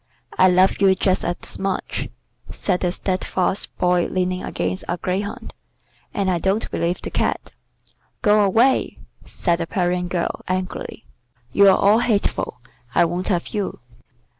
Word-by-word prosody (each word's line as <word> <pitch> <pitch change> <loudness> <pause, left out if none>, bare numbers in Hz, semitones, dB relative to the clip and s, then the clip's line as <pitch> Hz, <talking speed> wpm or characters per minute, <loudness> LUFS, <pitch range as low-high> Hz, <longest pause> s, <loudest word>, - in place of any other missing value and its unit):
"I 185 - +6
love 185 +2 +3
you 190 -1 +5
just 185 0 +1
as 175 0 -4
much," 195 -1 -2 0.4
said 185 -3 -1
the 180 - 0
steadfast 185 0 -1
Boy 180 -1 +2
leaning 185 0 -1
against 90 +1 -3
a 175 - -1
greyhound, 190 +3 -4 0.6
"and 195 -2 0
I 175 - 0
don't 195 +5 0
believe 175 +2 -1
the - - -5
Cat." - - -1 0.7
"Go 210 -1 +5
away," 230 +7 +2 0.3
said 170 -2 0
the 165 - -2
Parian 180 -1 0
girl, 175 -1 -2
angrily. 185 +4 -4 0.5
"You're 200 -1 +7
all 205 +3 +4
hateful. 205 - -1 0.3
I - - +5
won't 175 +2 -3
have 175 -4 0
you." 205 -3 -3
185 Hz, 140 wpm, -21 LUFS, 180-200 Hz, 0.7 s, You're